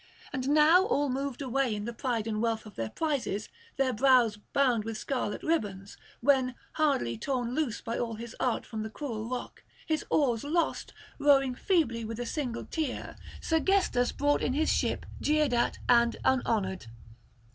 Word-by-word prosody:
And 260 -1 -2
now 310 +5 +6
all 290 -11 +1
moved 275 +1 -3
away 260 -3 0
in 205 0 -4
the 235 - -4
pride 235 -3 -2
and 215 -1 -2
wealth 225 -1 -1
of 210 - -11
their 115 -1 -3
prizes, 280 -10 -2 0.3
their 265 -2 +2
brows 245 -2 +4
bound 240 +1 +1
with 225 0 -4
scarlet 250 -4 -3
ribbons; 200 -11 -2 0.3
when, 260 -1 +3 0.2
hardly 120 - +1
torn 245 - -2
loose 275 -6 -1
by 230 - -3
all 230 -2 -2
his 230 +1 -8
art 250 - 0
from 220 -2 -5
the 220 - -4
cruel 225 -3 -5
rock, 250 -1 -6 0.2
his 315 -2 0
oars 245 -7 +2
lost, 320 +3 -1 0.3
rowing 275 -3 +4
feebly 250 -7 +1
with 225 +1 -5
a 245 - -2
single 245 -2 -3
tier, 310 -6 -4 0.3
Sergestus 325 -6 +2
brought 290 0 +1
in 255 - 0
his 310 +3 +2
ship - - -1 0.2
jeered 300 -3 +2
at 240 0 +1
and 235 -1 +4
unhonoured. 205 - +1
250 Hz, 170 wpm, -29 LUFS, 225-285 Hz, 0.3 s, now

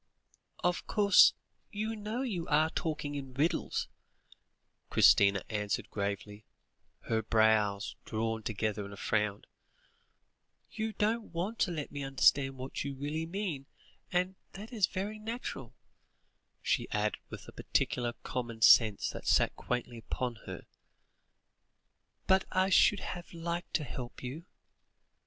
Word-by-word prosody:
"Of 175 0 0
course 200 -2 +6 0.4
you 220 +1 -2
know 215 +4 -3
you 190 -10 -3
are 155 +2 +3
talking 150 -3 -3
in 135 -3 -6
riddles," 150 +5 0 1.0
Christina 100 -1 +5
answered 105 -2 -2
gravely, 100 +1 -4 0.6
her 110 -1 0
brows 110 -2 +2
drawn 110 0 -2
together 110 -1 -2
in 100 0 -8
a - - -10
frown; 105 -1 0 1.3
"you 220 0 -3
don't 220 +2 0
want 185 +7 -3
to 180 - +2
let 155 -4 -4
me 145 - -5
understand 135 0 +3
what 130 +1 -4
you 140 -1 -4
really 150 +4 -3
mean, 170 -7 -3 0.4
and 180 +1 +1 0.2
that 215 +5 -9
is 215 -5 +3
very 205 +3 -4
natural," 215 - -6 0.9
she - - 0
added 105 0 0
with - - -9
a - - -9
practical 120 -1 0
common 120 -3 -4
sense 110 -3 +6
that - - -8
sat - - +3
quaintly 120 -1 -3
upon 125 +2 -3
her; - - -7 1.6
"but 190 0 +4
I 185 +1 +2
should 200 +1 +5
have 175 -1 -6
liked 170 +1 -4
to 155 - +1
help 125 -2 -7
you." 140 +7 -6
140 Hz, 130 wpm, -32 LUFS, 110-185 Hz, 1.6 s, course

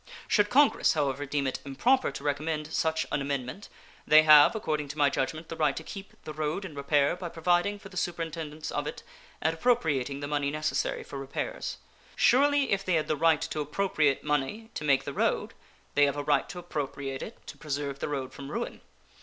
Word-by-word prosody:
Should 205 -1 +3
Congress, 285 +4 +4
however, 145 -2 -1
deem 140 0 -1
it 130 - -2
improper 245 - +2
to 140 - -8
recommend 150 +2 -2
such 160 0 +1
an 145 - 0
amendment, 135 - -4 0.4
they 155 +1 +8
have, 150 +5 +8
according 155 -8 -2
to 145 +2 -8
my 145 -1 +4
judgment, 155 +5 -2
the - - -6
right 150 -3 +1
to 160 - -5
keep 195 +4 -9
the 155 - -7
road 155 +5 -2
in 170 - -8
repair 140 +1 +2
by 180 -1 -6
providing 175 +5 +1
for 200 -1 -12
the 180 - -10
superintendence 165 -3 -4
of - - -2
it - - -6 0.4
and 160 +1 +2
appropriating 145 - +1
the 145 - -4
money 145 -1 0
necessary 155 +1 -1
for 140 - -7
repairs. 135 - -4 0.4
Surely 285 +2 +4
if 195 0 +1
they 185 -3 +1
had 155 - 0
the 155 - +1
right 160 0 +3
to - - -4
appropriate 150 -2 +1
money 150 - -2
to - - -5
make 140 -2 +3
the - - -5
road - - 0 0.4
they 145 - +5
have 140 - -2
a 145 - -2
right 145 -1 +1
to 180 - -7
appropriate 140 -5 -4
it 225 - -7
to - - -9
preserve 140 -2 -4
the - - -3
road 135 -3 -3
from 140 0 -8
ruin. - - -4
150 Hz, 205 wpm, -28 LUFS, 140-175 Hz, 0.4 s, they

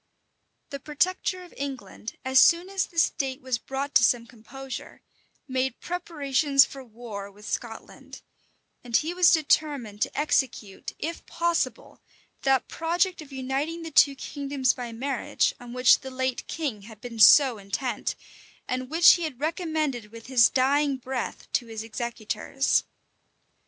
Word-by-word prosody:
The 280 - -5
protector 365 +5 -1
of 355 - -15
England, 255 -6 -7
as 260 0 +5
soon 340 +6 +5
as 390 -1 -1
the 335 - -18
state 270 -4 +1
was 255 -3 -2
brought 275 +3 -4
to - - +6
some 235 0 +3
composure, 250 +3 -10 0.4
made 260 -1 -1
preparations 290 -5 +2
for 270 -1 -10
war 220 -4 -8
with 210 +1 -14
Scotland; 225 -2 -7 0.6
and 235 -2 +2
he 320 +3 -2
was 360 -1 +5
determined 285 -9 +1
to - - -1
execute, 255 -9 -1
if 330 +2 -5
possible, 340 0 -2 0.4
that 270 -1 +2
project 345 +2 0
of 295 -2 -13
uniting 275 +5 -3
the 325 - -7
two 280 -1 +5
kingdoms 275 -2 -1
by 245 -2 -6
marriage, 260 +3 -1
on 245 -1 -10
which 250 0 +5
the 265 - -8
late 260 -1 -3
king 280 -11 -3
had 215 +1 -13
been 230 -1 -8
so 255 +1 +7
intent, 210 +4 -3 0.5
and 255 0 -3
which 330 +2 +7
he 350 - -2
had 305 -7 -4
recommended 310 - -2
with 230 0 -11
his 250 -3 +5
dying 275 +2 +2
breath 255 -1 -5
to 240 - 0
his 220 -1 -6
executors. 230 +3 -1
265 Hz, 145 wpm, -26 LUFS, 240-305 Hz, 0.6 s, so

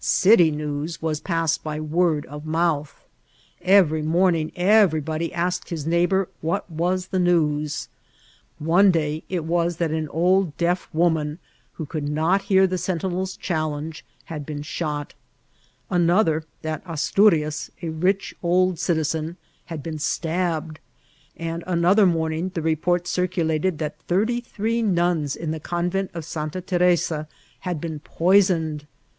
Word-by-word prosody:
City 190 -4 +5
news 150 +1 -3 0.3
passed 165 -4 0
by 155 -1 -4
word 155 0 +1
of 150 +2 -9
mouth* 155 -2 -1 0.6
Every 180 -5 +4
morning 165 0 +2
everybody 170 -5 +2
asked 175 +1 -2
his 160 -4 -4
neighbour 175 +3 +2
what 165 +2 -1
was 180 +3 -1
the 190 - 0
news* 155 -4 +1 0.7
One 175 +6 +4
day 155 -3 0
it 175 -4 -2
was 170 0 0
that 170 -3 0
an 155 -1 -2
old 175 0 +2
deaf 175 +1 0
woman, 160 -2 +1 0.4
who 160 - -6
ooQld 145 0 -4
not 160 +6 +2
hear 190 -1 +4
the 185 0 -1
eentinePs 185 +1 -2
challeiige, 155 -2 -3 0.2
had 155 -3 -6
been 145 0 -6
shot; 150 -2 -4 0.7
another, 170 -2 +2 0.2
that 155 -1 -3
Asturias, 165 -1 +2
a 165 - -2
rich 185 +5 0
old 180 0 +2
citizen, 160 0 -1 0.3
had 165 -5 -7
been 160 -2 -5
stabbed; 160 -1 -1 0.6
and 165 0 -4
another 185 +3 +4
morning 165 +1 0
the 165 - -2
report 165 +2 +1
circu 180 -1 -1
lated 160 +2 0
that 150 -1 -5
thirty*three 230 +3 0
nuns 175 -8 +1
in 160 -2 -4
the 160 - -3
convent 175 +4 -2
of 165 -2 -5
Santa 155 +2 -4
Teresa 175 -4 +1 0.4
bad 180 -4 -2
been 160 -1 -5
poisoned. 165 -3 +2
165 Hz, 135 wpm, -23 LUFS, 155-180 Hz, 0.7 s, City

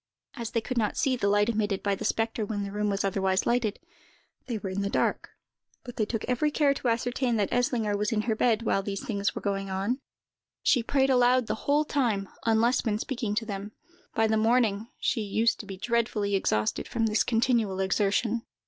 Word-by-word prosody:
As 235 -4 -5
they 230 - -1
could 250 +1 -2
not 210 -2 -1
see 270 -3 +2
the 200 -5 0
light 205 +1 +3
emitted 210 -4 -1
by 200 -1 +1
the 195 - -4
spectre 225 0 0
when 205 -1 -3
the 200 - -5
room 210 +1 -1
was 200 0 -1
otherwise 190 -1 +1
lighted, 235 -3 +1 0.7
they 235 -3 -2
were 195 -2 -5
in 195 +2 -2
the 200 - -1
dark; - - 0 0.5
but 245 -2 -10
they 215 - +1
took 225 -1 -3
every 255 +5 +1
care 290 -1 +3
to 270 - -4
ascertain 240 +1 0
that 205 -3 0
Eslinger 240 -4 +1
was 210 +1 -1
in 215 -2 +1
her 220 -2 0
bed 230 0 +2
while 195 - +1
these 200 +6 -5
things 200 -5 -1
were - - -5
going 195 -1 -2
on. 195 +7 -1 0.6
She 250 - +4
prayed 270 +3 +2
aloud 250 0 +4
the 215 - -1 0.2
whole 295 +2 +4
time, 230 -10 0 0.2
unless 230 +3 +3
when 215 -3 0
speaking 230 -3 -3
to 225 +1 -1
them. 205 0 -6 0.4
By 225 - +3
the 220 0 +2
morning, 220 -1 +2
she 235 - 0
used 220 +3 +1
to 205 - -8
be 195 -1 -7
dreadfully 220 -2 0
exhausted, 105 - 0
from 230 -1 0
this 215 -1 +2
continual 225 -4 +1
exertion. 205 +4 +1
220 Hz, 210 wpm, -28 LUFS, 200-240 Hz, 0.7 s, She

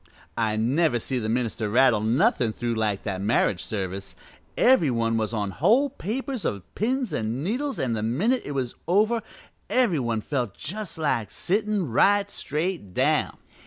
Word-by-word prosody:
"I 110 -2 0
never 125 +5 +2
see 125 +2 -2
the 110 -2 -3
minister 115 -2 -1
rattle 120 0 +4
nothin' 120 - +2
through 120 +1 -2
like 110 -3 -1
that 95 -3 -3
marriage 100 -4 +1
service. 95 -2 -4 0.4
Every 250 - +5
one 115 -2 0
was 110 -1 0
on 105 -3 -2
whole 230 - +3
papers 255 - -4
of 100 -3 -2
pins 250 +2 -1
an' 115 +5 -2
needles, 260 - -2
an' 125 -3 -1
the 110 - -2
minute 185 - +1
it 145 - -5
was 130 -3 -2
over 215 +6 +3 0.5
every 235 - +2
one 115 -3 -1
just - - -21
felt 145 - -3
like 145 -9 0
sittin' 205 - -1
right 200 - +3
straight 155 - -3
down. - - +1
130 Hz, 160 wpm, -25 LUFS, -, 0.5 s, Every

